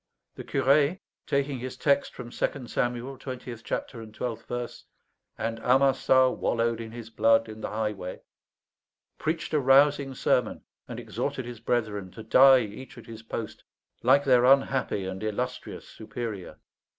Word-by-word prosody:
The - - -8
curé, 145 +6 +2 0.3
taking 140 -1 0
his 130 +1 -6
text 140 -1 +1
from 120 -2 -8
Second 130 -1 -3
Samuel, 120 +2 -2
twentieth 125 -3 -7
chapter 115 - -4
and 110 -1 -10
twelfth 115 +1 -5
verse, 120 -1 -5 0.5
"And 115 0 -3
Amasa 130 +1 +4
wallowed 115 0 0
in 115 - -7
his 115 -1 -9
blood 115 +1 +3
in 110 0 -9
the - - -3
highway," 105 -4 -4 1.0
preached 160 +1 -2
a 150 - +4
rousing 135 0 +4
sermon, 125 -2 0 0.2
and - - -6
exhorted 130 - -4
his 120 -2 -8
brethren 110 -5 -1
to 110 - -9
die 130 +3 +7
each 110 +4 -8
at - - -11
his 115 -1 -10
post, 115 -1 -6 0.4
like 135 +4 +5
their 125 -3 +4
unhappy 130 -6 +3
and 95 +1 -5
illustrious 125 +4 -4
superior. 110 -4 -7
120 Hz, 150 wpm, -27 LUFS, 110-135 Hz, 1.0 s, die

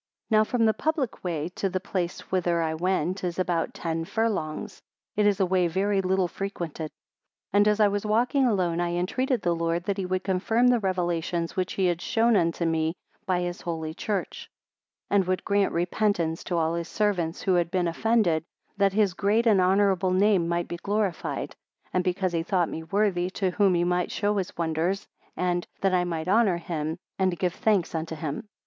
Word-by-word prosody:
2 - - +4
Now 215 - +6
from 230 +1 +1
the 220 - +4
public 305 -4 -2
way 165 -4 -2
to 195 +2 -2
the 185 0 -1
place 185 -2 -3
whither 175 -2 +1
I 160 -1 0
went 180 +2 -1
is 175 -2 -2
about 175 -3 -1
ten 165 -1 -2
furlongs; 210 -2 -2 0.3
it 210 0 +3
is 205 -2 +2
a 190 - +4
way 180 -1 +2
very 195 +3 +1
little 190 0 +1
frequented: 170 -5 -5 0.6
3 205 - +2
And 205 - +5
as 210 0 +3
I 210 - +6
was 205 0 -1
walking 240 +5 +2
alone, 180 -6 +1
I 175 0 -1
entreated 245 +7 0
the 175 -1 +2
Lord 165 +1 -1
that 200 +1 -2
he 185 - -2
would 185 0 -1
confirm 200 +5 +1
the 245 -1 +4
Revelations 175 -3 -1
which 185 0 -1
he 190 - +1
had 175 -1 +1
shown 230 -1 +2
unto 170 -2 +1
me 160 0 0 0.3
by 180 -2 +1
his 175 0 -4
Holy 160 -2 -4
Church. 200 +3 -4 0.6
4 205 - +3
And 190 -2 +2
would 185 0 -1
grant 200 -1 +2
repentance 175 -1 0
to 175 - -1
all 160 0 +1
his 170 0 -3
servants 185 -6 -1
who 190 - +2
had 175 -2 +2
been 180 -1 0
offended, 175 -3 +2 0.3
that 200 -1 +3
his 205 -3 +2
great 210 +5 +1
and 210 -5 +5
honourable 190 0 +3
name 190 -2 +3
might 170 0 -1
be 175 - -5
glorified, 200 -1 -2 0.4
and 180 - +2
because 185 0 0
he 165 - +1
thought 175 0 +1
me 160 - -5
worthy 180 +1 0
to 190 -1 -1
whom 195 0 +3
he 175 - +2
might 180 0 0
show 205 0 0
his 190 -2 -3
wonders, 170 +3 -1 0.3
and, 175 -1 0
that 195 -1 +2
I 180 -1 +2
might 165 -1 -3
honour 200 -2 +3
him, 160 -2 -3 0.2
and 185 -2 +1
give 180 -1 0
thanks 200 -6 +1
unto 160 0 -3
him. 155 +4 -5
185 Hz, 200 wpm, -26 LUFS, 170-200 Hz, 0.6 s, Now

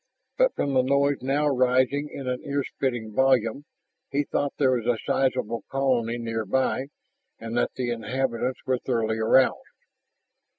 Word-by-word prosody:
But - - +2
from 140 - -1
the 130 - +4
noise 140 +1 +1
now 140 +3 +1
rising 130 +2 +2
in 135 -2 -7
an 125 0 -2
earsplitting 130 -5 -2
volume, 130 +1 +2 0.4
he 140 +1 0
thought 145 0 -2
there 135 -3 +3
was 120 -3 -1
a 120 - +2
sizable 125 -4 0
colony 125 -4 0
near 115 -1 -3
by 130 +4 0 0.5
and 115 0 -6
that - - 0
the 125 -2 -2
inhabitants 125 +2 -2
were 130 -1 0
thoroughly 110 -3 -1
aroused. 130 +4 +4
130 Hz, 145 wpm, -25 LUFS, 115-135 Hz, 0.5 s, the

